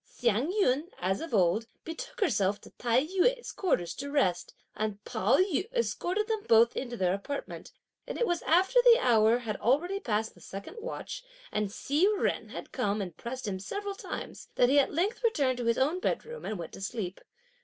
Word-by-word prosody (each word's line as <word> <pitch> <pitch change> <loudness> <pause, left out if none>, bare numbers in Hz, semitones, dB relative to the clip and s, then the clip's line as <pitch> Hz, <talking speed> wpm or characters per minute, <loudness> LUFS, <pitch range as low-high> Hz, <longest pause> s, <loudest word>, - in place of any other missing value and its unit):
Hsiang 245 - 0
yün, 335 -6 +1
as 190 +2 -1
of 330 - -6
old, 200 +2 +2 0.2
betook 330 +9 -7
herself 205 - +2
to - - -14
Tai 245 +3 +1
yü's 390 +8 +1
quarters 180 - 0
to 280 +1 -4
rest, 260 -12 0 0.2
and 215 -2 -2
Pao - - +2
yü 370 -1 +1
escorted 425 -4 -1
them 440 -2 -1
both 230 +1 +6
into 240 -2 -4
their 185 -2 +2
apartment, 240 +9 -5 0.4
and - - -4
it 475 - +2
was 350 -6 0
after 380 +9 +4
the 480 -1 +7
hour 225 - +4
had 225 -4 -4
already 340 - +1
past 220 - -1
the - - -19
second 200 - -8
watch, - - -6 0.3
and 210 -1 -1
Hsi 295 - +2
Jen - - -1
had - - -8
come 210 -5 0
and 180 -5 -5
pressed 255 0 -6
him 190 -2 -2
several 405 - -4
times, 395 - -7
that 245 - +4
he 285 +2 +6
at 275 - +2
length 380 +10 -1
returned 275 - +2
to 240 - -2
his 230 0 +2
own 300 +7 +2
bedroom 470 +5 -3
and 215 - -3
went 170 -2 -7
to - - -9
sleep. 195 -2 -4
260 Hz, 195 wpm, -30 LUFS, -, 0.4 s, the